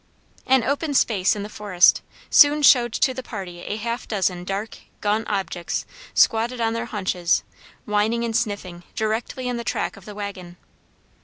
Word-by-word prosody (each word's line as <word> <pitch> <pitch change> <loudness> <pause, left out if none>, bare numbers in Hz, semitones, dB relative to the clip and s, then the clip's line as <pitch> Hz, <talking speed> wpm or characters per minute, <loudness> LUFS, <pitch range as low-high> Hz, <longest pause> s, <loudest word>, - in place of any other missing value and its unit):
An 260 -2 +4
open 285 +3 -1
space 200 -7 +3
in 205 - -4
the - - -5
forest 205 -4 +3 0.3
soon 295 +1 +6
showed 240 -4 +6
to 260 - +2
the 260 - -5
party 190 -8 -7
a 205 - -4
half 235 +3 -4
dozen 185 -4 -1
dark, 200 +4 -4 0.2
gaunt 215 +2 0
objects 190 -4 -2 0.3
squatted 235 +2 +3
on 225 -1 +1
their 230 +1 -3
haunches, 185 -5 0 0.4
whining 215 +3 +1
and 230 -1 -2
sniffing, 200 -6 -2
directly 225 +4 -2
in 245 -1 -2
the 235 - -4
track - - -2
of 195 - -15
the 210 - -9
wagon. 190 -4 -7
215 Hz, 165 wpm, -23 LUFS, 195-235 Hz, 0.4 s, soon